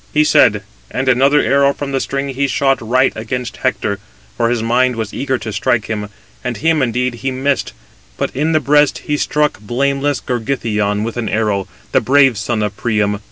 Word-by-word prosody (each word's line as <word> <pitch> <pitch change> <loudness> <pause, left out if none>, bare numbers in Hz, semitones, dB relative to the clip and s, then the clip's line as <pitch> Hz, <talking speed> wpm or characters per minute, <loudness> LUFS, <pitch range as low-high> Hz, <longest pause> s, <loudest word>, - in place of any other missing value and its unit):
He 150 - +5
said; - - +4 0.3
and 130 +1 -3
another 135 +3 +4
arrow 140 0 +3
from 140 -1 -5
the 135 - 0
string 135 +1 -3
he 135 +1 0
shot 135 0 +1
right 130 +4 +2
against 120 +2 -4
Hector, 105 -6 -1 0.4
for 115 -1 +1
his 120 -2 0
mind 125 +2 +2
was 110 -2 -4
eager 130 -1 -1
to 110 -3 -6
strike 115 +1 +1
him; 105 -2 -4 0.3
and 125 -3 -3
him 160 -1 +2
indeed 125 0 0
he 125 +3 -3
missed: 135 +2 -1 0.4
but - - -3
in 150 +4 +1
the 155 - +3
breast 145 -1 +3
he 150 - 0
struck 150 -2 0
blameless 140 +6 0
Gorgythion 110 -4 -1
with 115 +1 -4
an 115 -3 -2
arrow, 105 -3 0 0.2
the - - +3
brave 135 -5 +4
son 110 0 -1
of 105 -1 -3
Priam. 105 -3 0
125 Hz, 190 wpm, -17 LUFS, 110-140 Hz, 0.4 s, He